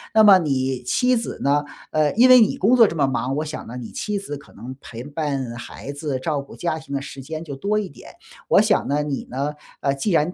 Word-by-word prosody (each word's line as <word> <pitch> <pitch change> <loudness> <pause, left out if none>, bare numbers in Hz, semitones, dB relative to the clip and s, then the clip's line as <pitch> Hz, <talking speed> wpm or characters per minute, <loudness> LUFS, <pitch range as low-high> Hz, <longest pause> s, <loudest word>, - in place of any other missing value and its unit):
那 220 - +7
么 200 -3 +8
你 130 -5 -1
妻 250 - +2
子 230 0 -4
呢 145 +1 +2 0.3
呃， 155 -1 +2
因 240 +4 +6
为 255 -1 +9
你 220 - +2
工 220 +7 +4
作 230 -4 +7
这 - - -4
么 145 -3 +2
忙， 135 0 -1
我 155 +2 -2
想 155 0 -7
呢， 125 - -7
你 120 -2 -7
妻 210 -1 -3
子 195 -7 -5
可 140 - -14
能 125 +5 -9
陪 115 0 -8
伴 140 -4 -3
孩 120 +3 -8
子， 145 -2 -3
照 145 +1 -1
顾 140 - -13
家 165 -2 -2
庭 155 -3 -7
的 140 - 0
时 140 -1 -8
间 155 +4 -6
就 145 -4 -7
多 200 +9 -1
一 210 -2 -1
点。 140 - -14 0.4
我 - - +5
想 - - +2
呢， 145 +1 0
你 145 -2 -3
呢， 140 +4 -2 0.3
呃， 140 -1 +1
既 140 +10 -2
然 165 +1 +2
145 Hz, 265 characters per minute, -22 LUFS, 135-180 Hz, 0.4 s, 为